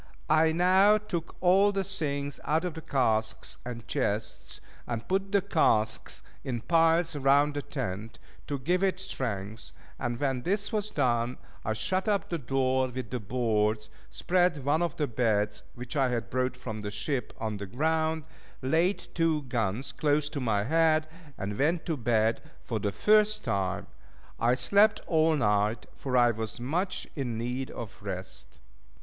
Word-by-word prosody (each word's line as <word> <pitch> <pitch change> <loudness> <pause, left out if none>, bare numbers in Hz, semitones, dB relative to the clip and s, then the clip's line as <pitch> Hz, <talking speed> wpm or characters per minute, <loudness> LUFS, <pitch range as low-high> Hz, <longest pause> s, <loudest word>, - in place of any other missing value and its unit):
I 160 +1 +5
now 190 +5 +5
took 175 -6 -5
all 195 +3 +5
the 195 -1 -1
things 145 -7 -3
out 160 +3 +1
of 180 - -2
the 160 - -7
casks 110 -7 0
and 120 -1 -7
chests, 110 -6 -2 0.3
and 115 -2 -4
put 195 +1 0
the 200 -2 +3
casks 110 - +1 0.2
in 120 -3 -3
piles 165 +1 +3
round 145 +1 +4
the 145 - -2
tent, 115 -6 -5 0.3
to 145 - -2
give 175 +8 0
it 190 -1 +1
strength; 115 - -4 0.3
and 120 -1 -2
when 135 -3 0
this 200 - -1
was 210 -1 -1
done, 120 - 0 0.3
I 110 - 0
shut 185 - -1
up 205 -2 +1
the 170 - -2
door 130 0 +1
with 125 -3 -6
the 125 - -2
boards, 110 -1 0 0.2
spread 175 -6 +1
one 150 +3 +2
of 170 -2 -1
the 150 - +1
beds 105 -4 0
(which 125 +2 -7
I 135 -3 +3
had 120 -2 -3
brought 130 0 0
from 110 -4 -6
the 105 - -4
ship) 110 +4 -2
on 110 -2 -2
the 100 0 -6
ground, 160 +7 0 0.4
laid 165 +8 +1
two 165 -3 +1
guns 120 -1 -2
close 150 -1 +1
to 150 - -4
my 110 -5 +1
head, 155 +4 +3 0.3
and 100 +1 -4
went 160 +4 +1
to 165 - 0
bed 115 -3 +1 0.2
for 115 -3 -2
the 100 0 -1
first 215 - +3
time. 100 -6 -1 0.5
I 120 +2 +3
slept 200 - +4
all 160 -1 +3
night, 105 -3 +1
for 130 -2 -1
I 120 -1 +6
was 110 +1 -5
much 180 +9 -1
in 125 -6 -2
need 125 +3 -3
of 110 -4 -8
rest. 90 -11 -7
130 Hz, 165 wpm, -29 LUFS, 115-165 Hz, 0.5 s, I